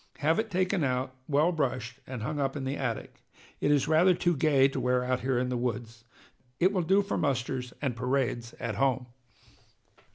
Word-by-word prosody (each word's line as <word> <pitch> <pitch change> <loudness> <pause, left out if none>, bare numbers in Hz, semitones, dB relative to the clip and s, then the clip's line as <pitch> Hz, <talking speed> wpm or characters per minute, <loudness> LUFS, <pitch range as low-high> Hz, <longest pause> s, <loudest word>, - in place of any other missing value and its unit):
Have 160 +6 +2
it 220 0 -1
taken 185 -1 +1
out, 130 -1 -1
well 150 +4 +3
brushed, 130 -5 -2
and 125 -4 -5
hung 150 +4 -3
up 135 0 0
in 140 - -4
the 135 +1 -2
attic. 125 -6 -4 0.4
It - - +1
is 145 -2 +3
rather 170 +4 +5
too 175 0 +1
gay 140 -2 +4
to 135 - -3
wear 125 0 +1
out 125 0 0
here 130 -1 0
in 125 +1 0
the 125 - -1
woods. 115 -1 -4 0.5
It 185 +3 +3
will 185 - +1
do 190 +4 +3
for 200 - -2
musters 125 -3 -1
and 130 -4 0
parades 125 -1 -1
at 110 -3 -3
home!" 130 -2 +1
135 Hz, 195 wpm, -29 LUFS, 125-155 Hz, 0.5 s, rather